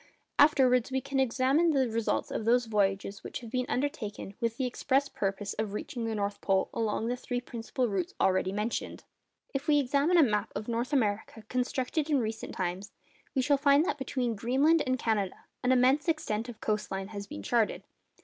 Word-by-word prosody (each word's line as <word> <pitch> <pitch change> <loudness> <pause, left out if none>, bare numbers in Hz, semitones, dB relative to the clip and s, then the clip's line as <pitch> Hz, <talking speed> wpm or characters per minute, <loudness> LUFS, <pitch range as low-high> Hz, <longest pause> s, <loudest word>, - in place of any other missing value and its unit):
Afterwards 260 -5 +5
we 265 0 0
can 275 +1 -2
examine 265 +6 +3
the 265 -3 +3
results 225 -1 -1
of - - -2
those 240 +2 +3
voyages 200 -2 0
which - - -6
have 230 -2 -9
been 255 0 -1
undertaken 250 -8 -3
with 230 0 -1
the 265 - 0
express 270 +3 +1
purpose 195 0 -3
of 215 -2 -2
reaching 235 +2 -4
the 225 -1 -2
North 200 -1 -2
Pole 190 -1 +1
along 220 -1 -1
the 245 +2 0
three 245 0 -3
principal 245 +1 -3
routes 190 -5 -2
already 185 0 +2
mentioned. 210 +4 -3 0.5
If 275 0 -3
we 300 -1 +5
examine 285 +5 +3
a 330 - +8
map 210 -4 0
of 210 +1 -4
North 235 +3 -2
America 220 -4 0
constructed 260 +4 -1
in 295 - +3
recent 220 -1 -4
times, 185 +2 -3 0.4
we 260 - +2
shall 285 +2 +3
find 280 +2 +4
that 290 - -2
between 255 -3 -1
Greenland 270 +9 +3
and 255 0 +1
Canada 215 -5 0 0.3
an 250 - +3
immense 260 +4 +4
extent 235 -8 -1
of 230 - -10
coast 215 -1 -1
line 195 0 -4
has 200 -2 -6
been 100 - -7
charted. - - +1
240 Hz, 190 wpm, -30 LUFS, 210-270 Hz, 0.5 s, a